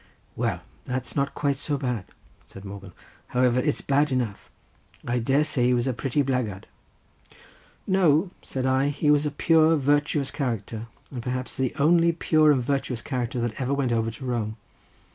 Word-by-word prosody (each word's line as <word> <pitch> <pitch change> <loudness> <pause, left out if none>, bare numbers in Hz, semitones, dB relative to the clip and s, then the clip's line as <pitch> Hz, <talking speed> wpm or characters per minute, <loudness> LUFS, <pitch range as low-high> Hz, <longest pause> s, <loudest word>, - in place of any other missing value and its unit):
"Well, - - -1 0.2
that's 125 0 -4
not 140 -1 0
quite 140 -2 0
so 145 +1 -2
bad," 125 -8 -2 0.4
said 95 +1 -12
Morgan; 100 -1 -8 0.4
"however, 125 0 +2
it's 150 +2 0
bad 145 +1 +2
enough. 120 -6 -2 0.6
I 120 +1 0
dare 135 +5 +2
say 140 -5 +1
he 125 - +3
was 120 0 0
a 130 - 0
pretty 135 +3 0
blackguard." 125 -8 -2 1.2
"No," 180 -2 +3
said 130 -1 -4
I; 130 +1 +2
"he 145 +1 +1
was 150 0 +3
a - - 0
pure, 160 +2 +4
virtuous 145 0 +1
character, 115 -4 -3 0.2
and 125 -3 -5
perhaps 125 +1 -4
the 130 -3 -1
only 165 +3 +4
pure 155 -2 +4
and 130 -4 +2
virtuous 135 -3 -2
character 125 -2 -2
that 120 +1 -3
ever 130 +2 0
went 135 -3 0
over 115 -1 +1
to 115 +4 -8
Rome. 115 -3 -2
130 Hz, 170 wpm, -25 LUFS, 120-145 Hz, 1.2 s, pure